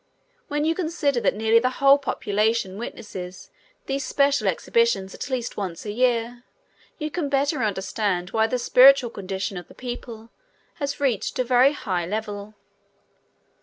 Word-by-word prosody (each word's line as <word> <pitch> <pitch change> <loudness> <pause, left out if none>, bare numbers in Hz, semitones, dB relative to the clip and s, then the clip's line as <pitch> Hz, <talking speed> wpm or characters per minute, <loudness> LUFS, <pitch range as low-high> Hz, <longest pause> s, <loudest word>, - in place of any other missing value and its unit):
When 295 +1 -1
you 325 - +2
consider 320 -6 0
that - - +1
nearly 220 +2 +4
the 255 +2 +1
whole 275 +1 +6
population 215 -5 -1
witnesses 185 -5 -8 0.3
these 275 0 -2
special 280 +1 +1
exhibitions 465 - +1
at - - -6
least 255 -3 -3
once 185 -3 -5
a 210 - -3
year, 240 +1 0 0.5
you 305 -2 -4
can 345 -1 -2
the - - -3
better 280 0 +1
understand 195 -3 -1
why 220 0 +2
the 250 - -1
spiritual 250 0 +6
condition 195 -1 -4
of 175 - -8
the - - -16
people 240 -2 -8 0.5
has 285 -2 -3
reached 255 -8 -1
a 255 - +2
high 260 +3 +4
very 175 -4 -2
level. 210 0 -5
235 Hz, 155 wpm, -24 LUFS, 205-275 Hz, 0.5 s, whole